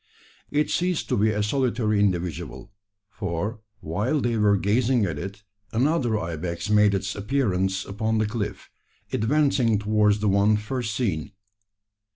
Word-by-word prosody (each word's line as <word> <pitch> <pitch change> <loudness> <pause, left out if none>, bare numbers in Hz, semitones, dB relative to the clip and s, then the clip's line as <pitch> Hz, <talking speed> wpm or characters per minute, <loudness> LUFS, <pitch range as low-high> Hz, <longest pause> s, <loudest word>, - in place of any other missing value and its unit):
It 150 +1 0
ceased 180 -1 0
to - - +2
be 105 +2 +3
a 105 -1 0
solitary 115 -2 +1
individual: 90 -1 -2 0.4
for 100 +2 -3 0.2
while 105 - -1
they 120 -3 0
were 105 -2 +3
gazing 115 +4 +2
at 80 -6 -3
it 100 +4 -7 0.3
another 125 -2 +1
ibex 85 +2 -4
made 105 -1 +5
its 95 0 -2
appearance 100 -5 0
upon 110 +3 -1
the 110 - +2
cliff, 105 -2 -4 0.4
advancing 125 -2 +2
towards 105 0 +2
the 105 - 0
one 100 +2 +4
first 110 0 -3
seen. 100 - -2
105 Hz, 140 wpm, -25 LUFS, 100-120 Hz, 0.4 s, made